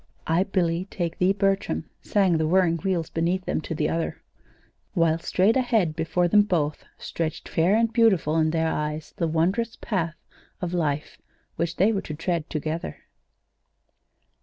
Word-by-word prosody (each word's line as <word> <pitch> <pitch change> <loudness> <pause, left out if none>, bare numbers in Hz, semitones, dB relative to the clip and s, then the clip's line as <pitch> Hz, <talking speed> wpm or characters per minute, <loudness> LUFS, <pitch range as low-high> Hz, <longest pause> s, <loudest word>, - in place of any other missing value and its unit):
"'I, 170 +4 +2
Billy, 180 -3 0
take 170 -3 -3
thee, 180 +1 +4
Bertram,'" 195 0 0
sang 190 -6 +2
the 160 - +1
whirring 175 -1 +3
wheels 175 -2 -2
beneath 175 +3 0
them, - - -1
to 160 - -5
the 150 0 0
other. 165 0 -2 0.8
While 165 -2 +3
straight 190 +6 +2
ahead 225 -11 +2
before 175 +2 +1
them 205 +4 +6
both, 165 -7 -1
stretched 165 -1 -4
fair 175 +5 +2
and 230 0 +2
beautiful 190 -10 +3
in 160 -1 +3
their 160 0 +1
eyes, 150 0 -3
the 170 - 0
wondrous 190 +9 0
path 170 -6 -2 0.4
of 180 -2 -3
life 155 -4 -2 0.4
which 170 +1 -2
they 205 +5 +3
were 195 - -1
to 155 - -6
tread 165 0 -2
together. 155 - -3
170 Hz, 160 wpm, -25 LUFS, 160-195 Hz, 0.8 s, them